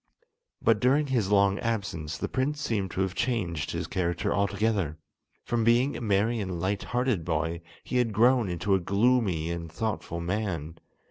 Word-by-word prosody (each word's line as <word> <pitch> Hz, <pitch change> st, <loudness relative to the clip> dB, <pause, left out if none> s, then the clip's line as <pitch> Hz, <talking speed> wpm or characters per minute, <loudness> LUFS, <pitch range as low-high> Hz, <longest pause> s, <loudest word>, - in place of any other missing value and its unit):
But 115 Hz, -2 st, +4 dB
during 135 Hz, +6 st, +3 dB
his 120 Hz, -8 st, 0 dB
long 100 Hz, -1 st, +3 dB
absence 100 Hz, -9 st, -3 dB
the -, -, -2 dB
prince 140 Hz, +3 st, -1 dB
seemed 105 Hz, -9 st, -1 dB
to 95 Hz, -, -2 dB
have 95 Hz, -1 st, 0 dB
changed 95 Hz, -, -1 dB
his -, -, -3 dB
character 85 Hz, -2 st, -1 dB
altogether. 100 Hz, -5 st, 0 dB, 0.5 s
From 120 Hz, -1 st, 0 dB
being 120 Hz, +5 st, +3 dB
a -, -, -5 dB
merry 110 Hz, +2 st, +1 dB
and 95 Hz, -4 st, -3 dB
light 95 Hz, +3 st, -1 dB
hearted 125 Hz, -7 st, 0 dB
boy, 80 Hz, +1 st, -1 dB, 0.2 s
he 125 Hz, -, -2 dB
had 120 Hz, -2 st, +2 dB
grown 120 Hz, 0 st, +4 dB
into 90 Hz, +3 st, 0 dB
a 95 Hz, -, +4 dB
gloomy 100 Hz, -4 st, +1 dB
and 85 Hz, -1 st, -5 dB
thoughtful 105 Hz, -3 st, -3 dB
man. 85 Hz, -4 st, -3 dB
100 Hz, 165 wpm, -28 LUFS, 85-115 Hz, 0.5 s, But